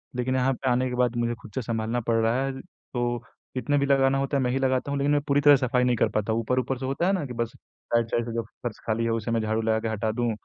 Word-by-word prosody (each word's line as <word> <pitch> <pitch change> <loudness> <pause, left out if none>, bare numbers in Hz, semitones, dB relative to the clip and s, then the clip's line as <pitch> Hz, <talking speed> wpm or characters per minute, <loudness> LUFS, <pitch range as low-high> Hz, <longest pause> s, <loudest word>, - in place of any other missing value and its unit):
लेकिन 125 +1 0
यहाँ 130 +1 +2
पे 130 +1 -2
आने 125 +1 +2
के 125 - -3
बाद 125 -1 +1
मुझे 120 0 0
खुद 110 - -12
से 130 - 0
सँभालना 115 +1 -1
पड़ 115 - +3
रहा 115 +4 +2
है। 135 - -1
तो 120 -8 -4 0.4
कितने 145 +3 +1
भी 140 - +2
लगाना 135 -1 +3
होता 140 +1 0
है 130 - +1
मैं 125 - +1
ही 130 - 0
लगाता 130 +1 0
हूँ 140 - 0
लेकिन 140 +1 +2
मैं 145 - +3
पूरी 145 0 +3
तरह 145 -1 +8
सफाई 125 -1 +1
नहीं 125 -1 +3
कर - - +2
पाता 105 +1 0
ऊपर-ऊपर 125 +3 0
से 130 - -5
होता 135 +6 -1
है 195 - +3
ना? 180 -6 -1
कि 125 - -6
बस 115 -1 -2 0.4
साइड 115 -1 +3
साइड 120 - +1
से 115 - -5
जो 115 - 0 0.2
फ़र्श 120 -3 -4
खाली 110 +1 0
है 115 - 0
उसे 115 0 -2
मैं 115 -1 +1
झाड़ू 110 +1 0
लगा 110 0 +1
के 115 - -3
हटा 110 0 -1
दूँ 120 0 0
125 Hz, 300 wpm, -26 LUFS, 115-135 Hz, 0.4 s, तरह